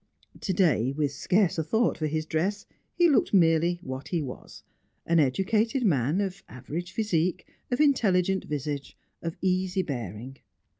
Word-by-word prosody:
To 195 - -2
day, 150 - +2
with 145 0 -1
scarce 180 +5 +1
a - - +1
thought 220 +10 +1
for 155 - -2
his 155 +1 -2
dress, 185 +7 -1 0.3
he 345 - +5
looked 280 -8 +3
merely 170 0 +3
what 130 -1 -6
he 175 - -1
was: 135 -5 -8 0.4
an 170 0 +3
educated 215 - +1
man, 150 - +2
of 195 -1 -3
average 160 +8 -6
physique, 185 -5 0 0.2
of 245 - -1
intelligent 195 -10 +2
visage, 145 -1 -4 0.2
of 165 -1 -5
easy 185 0 +1
bearing. 120 - -6
170 Hz, 150 wpm, -27 LUFS, 145-195 Hz, 0.4 s, he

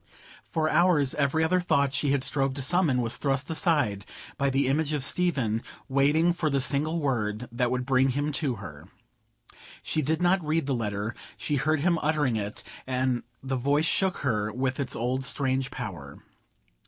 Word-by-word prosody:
For 155 -1 -1
hours 155 -4 +3
every 150 +2 +1
other 180 +3 +2
thought 140 -6 +1
that - - -14
she 140 -1 +1
strove 135 0 0
to 140 - -2
summon 145 -5 +2
was 115 - +1
thrust 140 +2 -1
aside 145 - +1 0.3
by 140 0 +1
the 135 +1 +1
image 150 +3 0
of 145 -3 0
Stephen 135 -9 +1 0.3
waiting 145 +6 +3
for 165 -2 -1
the 140 -1 +1
single 145 +5 +2
word 120 -5 -1
that 120 +1 0
would 125 0 -1
bring 130 0 +3
him 145 +3 -1
to 140 -4 0
her. 85 -9 -10 1.0
She 155 - -1
did 155 +3 0
not 180 +1 +2
read 155 0 0
the 140 - -1
letter: 105 -2 -2 0.2
she 145 - -1
heard 155 +3 +1
him 170 0 +2
uttering 150 -5 +1
it, 105 -1 -4 0.2
and 130 -1 0 0.2
the 135 0 -2
voice 140 +5 +1
shook 190 +2 +1
her 105 -4 0
with 130 +4 -2
its 135 -3 -2
old 125 +3 -1
strange 130 -1 0
power. 75 -8 -7
140 Hz, 180 wpm, -27 LUFS, 125-155 Hz, 1.0 s, hours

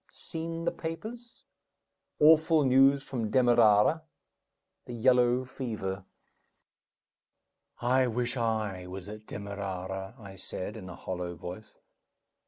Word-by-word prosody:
Seen 165 0 -6
the - - +2
papers? 220 +9 -7 0.8
Awful 160 0 +6
news 135 +2 +5
from 115 -6 -3
Demerara 120 +3 +4 0.8
the 125 - -7
yellow 125 +1 +3
fever 105 -7 -5 1.3
" - - -34 0.2
"I 130 - +3
wish 120 +2 -1
I 110 -6 -2
was 95 +1 -8
at 105 +1 -10
Demerara," 95 0 -5
I 100 -4 -11
said, 95 +2 -5
in 95 -4 -8
a 90 - -8
hollow 90 -1 -5
voice. 90 +6 -9
115 Hz, 110 wpm, -29 LUFS, 95-135 Hz, 1.3 s, Awful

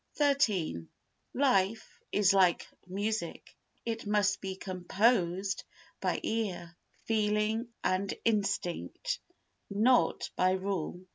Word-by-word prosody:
xiii 215 - +1 0.5
Life 225 -6 +1
is 205 -1 +4
like 185 -3 +4 0.2
music, 200 -1 -3 0.3
it 225 -2 -3
must 205 -2 +2
be 190 -1 -4
composed 190 0 +1 0.4
by - - 0
ear, 185 -6 -2 0.3
feeling 215 +1 +1 0.2
and 190 +1 +1
instinct, 210 - -1 0.5
not 225 +5 +3
by 185 0 +3
rule. 185 -2 -2
200 Hz, 90 wpm, -31 LUFS, 185-225 Hz, 0.5 s, is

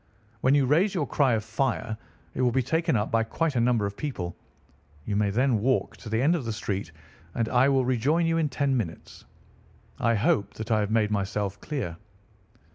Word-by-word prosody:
When 130 +2 +3
you 140 -2 +4
raise 175 +10 +2
your 155 -5 0
cry 135 -3 +2
of 110 -1 0
fire, 120 -2 -1 0.4
it - - -2
will 125 - +4
be 130 +1 +1
taken 160 +4 +1
up 105 -1 0
by 115 0 +3
quite 150 +6 -1
a 120 - +2
number 115 -3 +2
of 100 0 -4
people. 95 - -4 0.7
You 105 - -2
may 105 0 +2
then 120 +2 +2
walk 130 +5 0
to 110 - -9
the 110 +1 0
end 155 +5 +4
of 160 - -2
the 115 - -3
street, 100 -4 -3 0.4
and 115 - 0
I 130 +2 +4
will 135 -2 +2
rejoin 135 +7 +2
you 165 0 +1
in 155 -2 +1
ten 140 0 0
minutes. 95 -10 -5 0.7
I 115 0 +2
hope 100 -1 +1
that 110 +1 -6
I 110 - +4
have 105 -1 0
made 110 -1 +2
myself 100 -1 -2
clear?" 125 - -4
120 Hz, 205 wpm, -27 LUFS, 105-140 Hz, 0.7 s, you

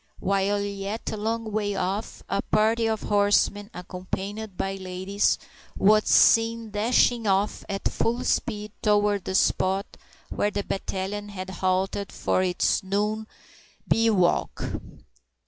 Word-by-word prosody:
While 200 +1 +1
yet 200 +2 -4
a - - -3
long 220 +1 -2
way 205 -1 -1
off, 195 +4 -3
a 200 - 0
party 225 +2 +2
of 220 -1 -2
horsemen, 205 0 +2
accompanied 190 +3 -6
by 195 - -1
ladies, 190 +1 0 0.4
was 215 +2 +4
seen 225 -1 +4
dashing 230 +2 +2
off 195 +1 +1
at 195 0 -1
full 235 +2 -1
speed 210 -2 -1
toward 205 -2 +2
the 190 - -2
spot 190 +1 +2 0.5
where 205 - +1
the 205 -1 -3
battalion 195 +2 -4
had 190 -2 -6
halted 190 +2 -1
for - - 0
its 180 -1 +1
noon 210 +3 -1 0.6
bivouac. 215 -6 +2
205 Hz, 125 wpm, -25 LUFS, 195-215 Hz, 0.6 s, was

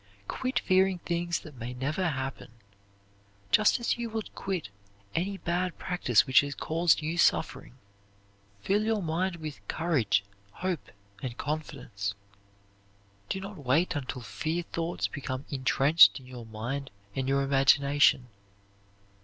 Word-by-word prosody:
Quit 260 0 -2
fearing 190 0 +3
things 170 0 -2
that 150 -4 -12
may 125 +2 -5
never 150 +8 -1
happen, 135 -2 -4 1.0
just 215 +4 +5
as 235 0 0
you 235 -1 -3
would 220 -1 -5
quit 185 - -3 0.4
any 195 - -1
bad 180 0 -2
practise 150 - +2
which 130 - +6
has 145 0 -5
caused 165 -1 +2
you 165 +3 -2
suffering. 125 - +1 0.9
Fill 205 +2 +2
your 220 -2 0
mind 175 +3 -1
with 155 -3 -7
courage, 120 - +1 0.3
hope, 180 -4 -3 0.3
and 125 -2 -5
confidence. 125 -10 -4 1.1
Do 190 - -2
not 195 -2 -8
wait 150 +7 +1
until 130 -3 -4
fear 160 +10 -2
thoughts 170 0 -2
become 135 -1 -5
intrenched 140 +4 +5
in 130 - -15
your 125 -3 -9
mind 120 +6 -4 0.3
and 135 0 -1
your 140 0 +2
imagination. 140 0 +4
155 Hz, 130 wpm, -29 LUFS, 130-180 Hz, 1.1 s, which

